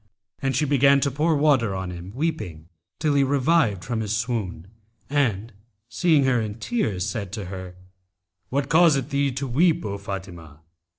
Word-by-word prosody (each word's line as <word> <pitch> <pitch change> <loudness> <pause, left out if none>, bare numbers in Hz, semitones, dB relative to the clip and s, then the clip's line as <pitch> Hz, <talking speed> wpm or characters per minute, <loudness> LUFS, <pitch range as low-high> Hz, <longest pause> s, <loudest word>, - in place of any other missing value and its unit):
And 135 -1 0
she 150 - +2
began 140 0 +4
to 140 - +1
pour 155 +4 +1
water 135 -9 +2
on 95 -1 -4
him 90 +2 -8
weeping, 110 - -3 0.3
till 155 -2 +1
he 140 -1 +4
revived 135 - +2
from 120 -3 -2
his 110 0 -1
swoon; 110 -8 -3 0.5
and, 115 -6 0 0.4
seeing 160 -3 +3
her 125 -3 +2
in 105 -1 -4
tears 110 - -2
said 100 -2 -4
to 105 -3 -4
her, 90 -1 -8 0.7
'What 140 +1 -1
causeth 160 -5 +3
thee 140 0 +1
to 135 +2 -3
weep, 155 +3 +2
O 100 -1 -4
Fatimah?' 90 -6 -8
120 Hz, 165 wpm, -24 LUFS, 95-140 Hz, 0.7 s, began